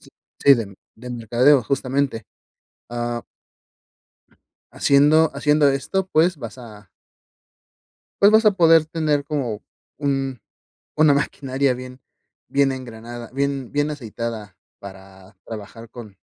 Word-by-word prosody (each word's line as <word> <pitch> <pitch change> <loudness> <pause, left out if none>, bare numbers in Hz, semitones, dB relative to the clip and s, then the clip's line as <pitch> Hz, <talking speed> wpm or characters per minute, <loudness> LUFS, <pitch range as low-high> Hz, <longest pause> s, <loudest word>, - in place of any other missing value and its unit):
Sí, - - -19 0.3
sí 140 -1 +8
de, 105 -5 -5 0.2
del 125 +2 -8
mercadeo 120 +4 +3
justamente, 135 -3 -1 0.7
ah 120 0 -3 1.5
haciendo 150 +3 +4
haciendo 150 +1 +3
esto, 185 +8 -2
pues, 170 0 +2
vas 120 -1 -8
a 105 -4 -13 1.3
pues 200 +1 +7
vas 220 0 +5
a 215 - +7
poder 165 -4 +5
tener, 155 -3 -1
como 130 -8 -3 0.3
un 135 -3 -2 0.6
una 155 -1 +5
maquinaria 135 -2 -1
bien 125 +1 -9 0.5
bien 140 -1 +2
engranada 120 -2 -8
bien 140 -2 -2
bien 145 +1 0
aceitada 115 - -6 0.2
para 95 0 -13
trabajar 115 +1 -9
con 110 -5 -12
130 Hz, 115 wpm, -21 LUFS, 115-145 Hz, 1.5 s, sí